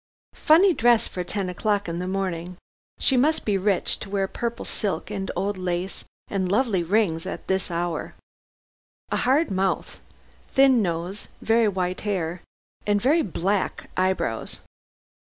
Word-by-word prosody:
Funny 350 +5 +6
dress 240 -4 +4
for 180 - -4
ten 195 +1 -3
o'clock 205 +2 0
in 170 0 -3
the 180 - -3
morning. 180 -2 -3 0.4
She 265 - +3
must 295 +6 +2
be 210 - +2
rich, 195 -1 +1
to 200 - -7
wear 195 -1 0
purple 235 +3 -4
silk 190 -1 -2
and 195 -2 -3
old 195 +2 -1
lace 180 +1 -2 0.2
and 190 -2 -1
lovely 210 -4 +2
rings 170 -2 +1
at - - -6
this 190 0 0
hour. 170 -2 -3 1.0
A - - +1
hard 275 +4 +2
mouth, 190 0 -1 0.6
thin 265 -3 +6
nose, 175 +2 -3 0.2
very 225 0 +4
white 185 -2 -1
hair 180 -4 -2 0.5
and 205 0 +3
very 290 +10 +3
black 195 - -1
eyebrows. 185 -11 -1
195 Hz, 145 wpm, -25 LUFS, 180-220 Hz, 1.0 s, Funny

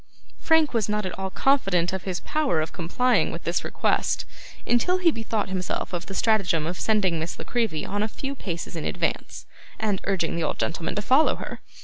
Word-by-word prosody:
Frank 320 -3 +3
was 220 -3 +1
not 210 -1 0
at 185 - -3
all 190 0 -2
confident 190 -9 +2
of 190 - -4
his 185 -2 -2
power 300 - +1
of 155 0 -2
complying 240 +8 +2
with - - -6
this - - 0
request, - - 0 0.4
until 300 +10 +3
he 355 -2 +4
bethought 225 -5 -2
himself 185 0 -2
of 175 0 -3
the 195 - -6
stratagem 195 -9 +2
of 175 +3 -3
sending 195 -6 +2
Miss 160 +1 -4
La - - -7
Creevy 225 -10 -1
on 205 +1 -2
a 215 - +1
few 270 +5 -5
paces 175 -11 -5
in 160 - -3
advance, - - -2 0.3
and 210 -3 0
urging 185 -4 0
the 170 - -1
old 150 - -1
gentleman 165 0 -2
to 210 - -1
follow 265 +8 +4
her. - - -7
195 Hz, 205 wpm, -25 LUFS, 175-235 Hz, 0.4 s, he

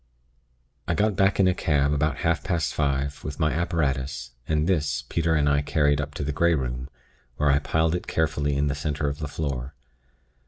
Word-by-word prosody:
"I 85 - +1
got 105 +1 +1
back 95 +1 +2
in 95 - +5
a 90 - +4
cab, 75 -4 +1
about 75 0 0
half 80 -3 +1
past 85 -5 -1
five, 70 -1 -1
with 75 - -6
my 75 -2 +2
apparatus, 70 -7 -1 0.2
and 75 -1 +1
this, 75 -6 0
Peter 80 -1 +1
and 75 -2 +2
I 70 0 +3
carried 75 -1 +2
up 70 +1 -6
to 75 - -3
the 75 - -1
Grey 85 +3 +3
Room, 65 -1 -3 0.5
where 75 -1 +3
I 70 - +4
piled 80 +2 +1
it 90 - -3
carefully 75 -2 0
in 70 - +2
the 70 - 0
center 75 0 -2
of 70 0 -3
the 75 - -3
floor. 70 -2 -4
75 Hz, 200 wpm, -25 LUFS, 70-80 Hz, 0.5 s, in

